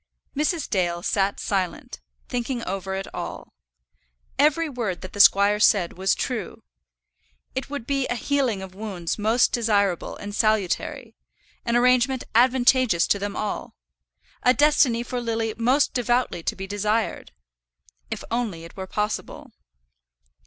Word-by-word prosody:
Mrs. 305 +3 0
Dale 175 -3 -1
sat 195 0 0
silent, 185 - -3 0.3
thinking 245 0 -3
over 190 0 -3
it 195 0 -4
all. - - -7 0.9
Every 305 +3 +3
word 230 -10 -3
that 185 - -9
the 205 - -7
squire 200 +1 +6
said 195 -5 +3
was 190 +2 +1
true. 250 -4 -4 0.9
It 260 - -4
would 285 -5 -5
be 275 -1 0
a 245 - -1
healing 250 -6 0
of 190 -1 -10
wounds 190 -3 -4
most 225 +4 +3
desirable 205 -6 0
and 205 0 -7
salutary; 215 -4 0 0.5
an 235 - 0
arrangement 250 +1 +3
advantageous 245 -5 +4
to 200 - +2
them 200 0 -4
all; 210 - -4 0.7
a 250 +1 +4
destiny 285 -5 +3
for 245 0 -4
Lily 225 -1 -1
most 250 +5 +2
devoutly 245 -6 0
to - - -2
be 190 - -6
desired, 210 +3 -1 0.8
if - - -5
only 225 -9 -2
it 165 - -12
were 190 -1 -6
possible. 210 +2 -4
220 Hz, 140 wpm, -24 LUFS, 195-250 Hz, 0.9 s, squire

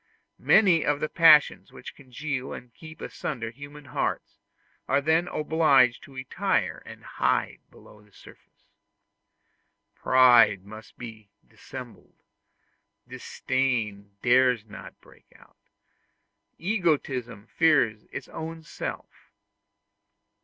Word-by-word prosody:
Many 185 -7 +4
of 145 -1 0
the 155 - -1
passions 155 -3 +4
which - - -11
congeal 135 0 -6
and 125 -2 -11
keep 160 0 -13
asunder 115 -6 -5
human 145 +3 -12
hearts, 130 - -4 0.5
are 140 - +2
then 160 +4 +1
obliged 150 -7 +2
to 135 - -16
retire 130 0 -2
and - - -12
hide - - -1
below 105 - -18
the 105 0 -25
surface. - - -19 1.3
Pride 120 -7 +4
must 110 +1 -13
be 110 -4 -11 0.2
dissembled; - - -12 0.8
disdain 110 -7 -3
dares 125 -2 +3
not 105 -2 -12
break - - -22
out; - - -23 1.0
egotism 145 - -2
fears 120 -8 +1
its - - -7
own 160 0 -8
self. 150 - -8
130 Hz, 105 wpm, -26 LUFS, 115-155 Hz, 1.3 s, Many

